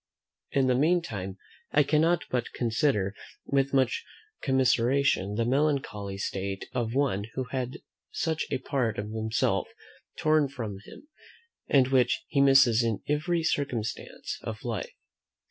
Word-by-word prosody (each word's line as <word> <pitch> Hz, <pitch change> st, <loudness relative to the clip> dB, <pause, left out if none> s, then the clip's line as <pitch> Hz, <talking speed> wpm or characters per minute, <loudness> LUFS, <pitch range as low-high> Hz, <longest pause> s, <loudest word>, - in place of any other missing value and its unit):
In 135 Hz, -1 st, +2 dB
the 130 Hz, -, +3 dB
meantime, 125 Hz, -, 0 dB, 0.3 s
I 150 Hz, -, +5 dB
cannot 160 Hz, +4 st, +2 dB
but 125 Hz, -2 st, -1 dB
consider, 110 Hz, -4 st, +1 dB, 0.3 s
with 140 Hz, 0 st, +1 dB
much 130 Hz, -3 st, +2 dB, 0.4 s
commiseration, 130 Hz, -5 st, +2 dB
the 115 Hz, +1 st, +1 dB
melancholy 130 Hz, -7 st, 0 dB
state 95 Hz, 0 st, -3 dB
of 120 Hz, -2 st, -2 dB
one 130 Hz, -8 st, +1 dB
who 130 Hz, -, -1 dB
has 130 Hz, -1 st, -2 dB
had -, -, -11 dB, 0.3 s
such 160 Hz, -1 st, -2 dB
a 135 Hz, -, 0 dB
part 130 Hz, -4 st, -1 dB
of 105 Hz, +1 st, -4 dB
himself 110 Hz, 0 st, 0 dB, 0.5 s
torn 155 Hz, -2 st, +3 dB
from 110 Hz, -8 st, -5 dB
him, 300 Hz, -, -13 dB, 0.6 s
and 135 Hz, -2 st, +4 dB
which 130 Hz, -2 st, +2 dB
he 140 Hz, -, +2 dB
misses 135 Hz, -4 st, +6 dB
in 115 Hz, -3 st, -1 dB
every 160 Hz, +3 st, 0 dB
circumstance 130 Hz, -8 st, -3 dB
of 110 Hz, 0 st, -6 dB
life. 115 Hz, -5 st, -3 dB
130 Hz, 135 wpm, -28 LUFS, 110-140 Hz, 0.6 s, misses